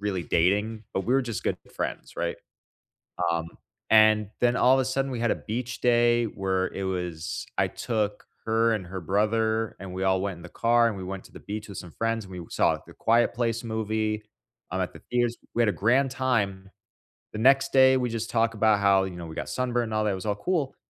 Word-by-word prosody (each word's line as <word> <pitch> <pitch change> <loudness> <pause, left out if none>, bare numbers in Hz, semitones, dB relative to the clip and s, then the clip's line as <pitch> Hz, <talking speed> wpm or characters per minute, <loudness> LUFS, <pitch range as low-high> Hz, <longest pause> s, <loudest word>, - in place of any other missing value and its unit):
really 95 -4 -2
dating, 105 +6 +1
but 95 - -1
we 125 +6 +1
were 135 - +3
just 115 -5 -5
good - - 0 0.2
friends, - - -4
right? - - -2 1.0
Um, 85 0 -1 0.4
and 110 -1 +5
then 120 0 +3
all 130 +1 +5
of - - +2
a 130 - +1
sudden 135 +1 -1
we 120 - -3
had 120 -1 +1
a - - +2
beach 120 +1 -5
day 120 -1 +4
where 95 -3 -1
it 95 - -4
was, 90 -3 -3
I - - +3
took 105 -3 -2 0.2
her 115 +1 +3
and 100 -5 -3
her 95 0 -6
brother, 110 +4 +1
and 95 -2 -8
we 95 +1 -3
all 95 -1 +2
went 100 -2 -3
in 85 - -13
the - - -10
car, 120 0 +3
and 110 - -2
we 95 - -6
went 95 +1 -6
to - - -16
the - - -11
beach 105 +1 -6
with 100 - -8
some 90 - -10
friends, 115 +3 -2
and 95 - -13
we 85 - -8
saw - - +2
The - - -14
Quiet 115 +1 +2
Place 115 -1 -1
movie, 110 -1 -2 0.5
I'm 95 - -2
at 90 - -3
the - - -13
theaters, 120 -1 +1 0.2
we 120 - +2
had 115 - +4
a - - +3
grand 130 +7 +2
time. 100 -8 -1 0.6
The 110 - -4
next 135 +3 +4
day, 130 0 +6
we 125 -2 -1
just 115 0 -3
talk 115 -1 +1
about 110 -1 +3
how, 100 -1 +4
you 95 -2 -6
know, 85 -1 -7
we 80 -1 -9
got - - -4
sunburned 125 -1 0
and 110 - -6
all 110 0 +1
that, 105 - +1
it - - -1
was 95 - -7
all 105 -1 0
cool. 145 - -1
110 Hz, 235 wpm, -26 LUFS, 95-120 Hz, 1.0 s, day